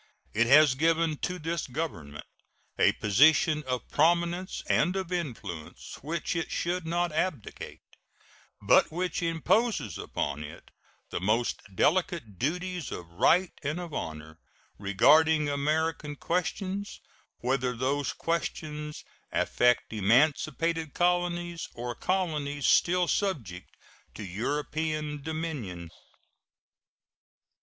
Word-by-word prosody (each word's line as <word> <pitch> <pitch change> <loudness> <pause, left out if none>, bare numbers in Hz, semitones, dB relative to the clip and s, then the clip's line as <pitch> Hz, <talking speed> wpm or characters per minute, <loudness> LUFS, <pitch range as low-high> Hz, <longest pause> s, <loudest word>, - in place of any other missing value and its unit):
It 120 +2 +3
has 145 +1 +7
given 160 +2 +1
to 180 +5 -3
this 165 0 -3
Government 85 - -5 0.5
a - - +5
position 150 +8 +4
of 125 -2 -2
prominence 170 +3 +1
and 180 - +2
of 190 -2 -3
influence 110 - -5
which 165 +4 -3
it 165 - -2
should 175 0 -2
not 175 +1 0
abdicate, 155 - -3 0.8
but - - +4
which 180 +3 -2
imposes 175 +8 +1
upon 75 +2 -3
it 80 +3 -11 0.4
the - - -3
most 110 +5 +1
delicate 155 - +1
duties 180 +2 -2
of 85 -1 -7
right 170 - +3
and 150 +3 -2
of 175 -3 -7
honor 80 -3 -6 0.4
regarding 150 +10 +4
American 150 +1 -1
questions, 185 +5 -2 0.4
whether 125 0 0
those 140 +3 0
questions 150 -2 -3 0.3
affect 120 -2 +2
emancipated 150 - +1
colonies 175 -1 0
or 120 +1 -4
colonies 150 -5 -1
still 180 0 +4
subject 125 - -2 0.4
to - - -6
European 150 - -2
dominion. 140 - -5
155 Hz, 105 wpm, -28 LUFS, 125-170 Hz, 0.8 s, has